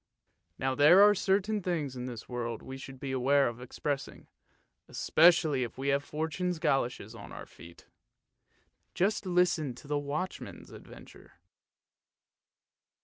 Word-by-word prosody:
Now 130 0 -1
there 155 +9 +7
are 205 0 +7
certain 205 +2 0
things 160 -7 -2
in 125 0 -5
the 120 -3 -6
world 120 -2 -4
we 135 0 -8
should 135 -1 -10
beware 135 +1 +2
of 120 +1 -6
expressing, 140 +3 -5 0.6
especially 160 -4 +3
if 120 -1 -4
we 135 +1 -2
have 140 +1 +1
Fortune's 160 +4 -3
goloshes 125 -7 -1
on 115 - -11
our - - -8
feet. 85 0 -15 1.1
Just 195 +1 0
listen 175 -7 +1
to 140 - -14
the 145 0 0
watchman's 145 +6 -5
adventure. - - -14
140 Hz, 130 wpm, -30 LUFS, 130-175 Hz, 1.1 s, there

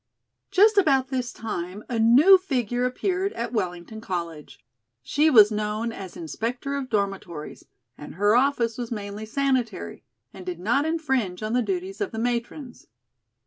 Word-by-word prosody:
Just 410 +2 +5
about 270 -7 +2
this 255 -2 -2
time 200 -2 -6
a 235 -2 -2
new 275 +13 +7
figure 250 - -1
appeared 375 +9 -1
at 235 +1 -4
Wellington 185 0 -4
College. 170 -6 -5 0.5
She 295 - +2
was 215 -6 +7
known 215 +2 -2
as 195 -5 -9
"inspector 235 - -4
of 270 -2 -4
dormitories," 195 -7 -3 0.3
and 150 - -9
her 205 +4 +3
office 245 -3 +1
was 240 -1 -5
mainly 210 0 -5
sanitary, 245 - -1 0.3
and 190 - -10
did 180 -2 -5
not 240 +10 +1
infringe 265 - -1
on 215 +1 -2
the 250 - +3
duties 375 - -4
of 405 - 0
the 225 - -8
matrons. 240 +3 -4
235 Hz, 150 wpm, -25 LUFS, 205-275 Hz, 0.5 s, new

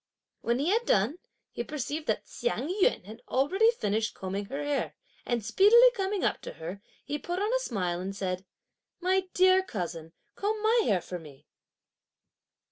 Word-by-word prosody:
When 235 +1 +1
he 290 +6 0
had 460 +3 +1
done, 220 - +2 0.3
he 235 - -4
perceived 300 +3 -4
that - - 0
Hsiang 320 - -2
yün 180 - +3
had 220 +4 -10
already 375 - +3
finished 220 - -1
combing 195 +2 -4
her 275 +7 -4
hair, 290 -1 -1 0.3
and 235 -3 -1
speedily 470 - +7
coming 395 -3 -2
up - - 0
to - - -7
her, 175 +5 -7 0.2
he 295 +1 -3
put 350 +6 -4
on 420 +5 0
a - - +3
smile, 185 - -2
and 195 +2 -5
said: 185 -2 -3 0.6
"My 370 +1 +1
dear 370 +1 +6
cousin, 170 - -5 0.2
comb 425 +2 -1
my 455 +2 +4
hair 195 -5 +2
for 180 +1 -6
me!" 145 -4 -14
275 Hz, 170 wpm, -29 LUFS, -, 0.6 s, speedily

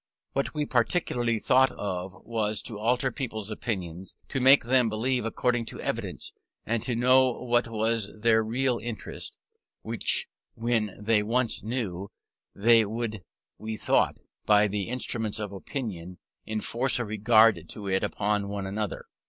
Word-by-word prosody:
What 140 +3 -1
we 150 -1 0
principally 120 -3 +1
thought 130 +4 +4
of, 95 -1 -4
was 110 -2 -1
to 110 -4 -6
alter 125 +4 +1
people's 110 -6 -4
opinions; 95 -5 -4
to 135 - -1
make 135 +2 +7
them 125 0 +3
believe 120 +2 0
according 120 +1 0
to - - -8
evidence, - - -4 0.3
and 115 -1 -1
know 130 +2 +5
what 120 -1 +1
was 110 -1 0
their 110 0 +4
real 125 +2 0
interest, 115 -1 -6 0.5
which - - 0 0.3
when 115 -3 0
they 105 0 +2
once 115 +3 0
knew, 100 -5 -3 0.5
they 115 +2 +5
would, 110 -1 -3 0.4
we 110 0 -4
thought, - - +2 0.3
by 105 0 +6
the 100 +1 -3
instrument 115 -3 -2
of 105 -2 -4
opinion, 95 - -6 0.3
enforce 115 +4 0
a 120 - -1
regard 110 +1 +4
to 105 - -7
it 95 0 +1
upon 105 -1 0
one 100 -1 -3
another. 105 +1 -3
110 Hz, 145 wpm, -27 LUFS, 105-120 Hz, 0.5 s, make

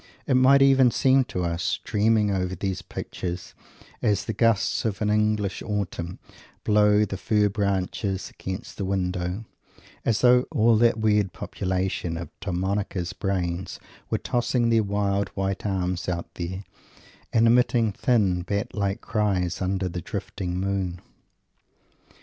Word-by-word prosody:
It - - +1
might 135 +2 +6
even 135 -2 +6
seem 130 +2 +3
to 90 -6 -3
us, 85 +1 -1
dreaming 105 0 +2
over 95 -1 -1
these 95 +1 -3
pictures 90 -1 -6 0.5
as 105 -1 +1
the 110 - -2
gusts 115 -1 +2
of 105 -4 -2
an 105 -1 +1
English 105 -2 +1
autumn 95 -4 -3 0.5
blow 105 0 +4
the 95 -1 -5
fir 105 +1 +2
branches 100 -1 -2
against 95 +4 -7
the 100 - -3
window, 90 +1 -2 0.6
as 110 -2 +1
though 125 0 +5
all 115 -6 +4
that 115 0 +4
weird 105 -4 +2
population 90 -2 -2
of 85 - -6
Domenico's 95 -1 -2
brain 90 -2 -2 0.4
were - - +1
tossing 120 -1 0
their 115 -1 +4
wild, 100 -1 0
white 95 +1 -2
arms 90 -2 -1
out 85 -1 -4
there 95 +3 -5 0.7
and 115 0 +4
emitting 115 -1 +3
thin, 100 -5 +1
bat 100 +6 -3
like 100 -2 -1
cries 100 -5 0
under 95 0 0
the 90 0 -4
drifting 90 +1 -4
moon. 95 -2 -2
100 Hz, 140 wpm, -25 LUFS, 90-110 Hz, 0.7 s, might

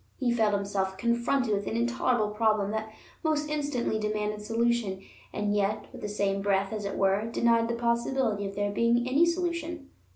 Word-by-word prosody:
He 245 -3 +1
felt 220 -3 +2
himself 195 -1 -2
confronted 235 +2 +1
with 200 0 -1
an - - -2
intolerable 240 -2 +1
problem 215 -2 +2
that 220 0 -3 0.3
most 305 -2 +1
instantly 285 -7 -1
demanded 210 0 -2
solution, 225 -3 0 0.3
and 205 0 -1
yet, 205 +1 0
with - - -10
the 210 - -4
same 200 -1 0
breath, 195 0 +1
as 210 -2 -4
it 200 - -3
were, 195 +2 +2
denied 230 0 +2
the 235 - -1
possibility 235 -2 0
of 195 - -7
there 205 0 0
being 235 +3 +2
any 290 +7 +4
solution. 335 -3 -2
220 Hz, 175 wpm, -28 LUFS, 205-240 Hz, 0.3 s, any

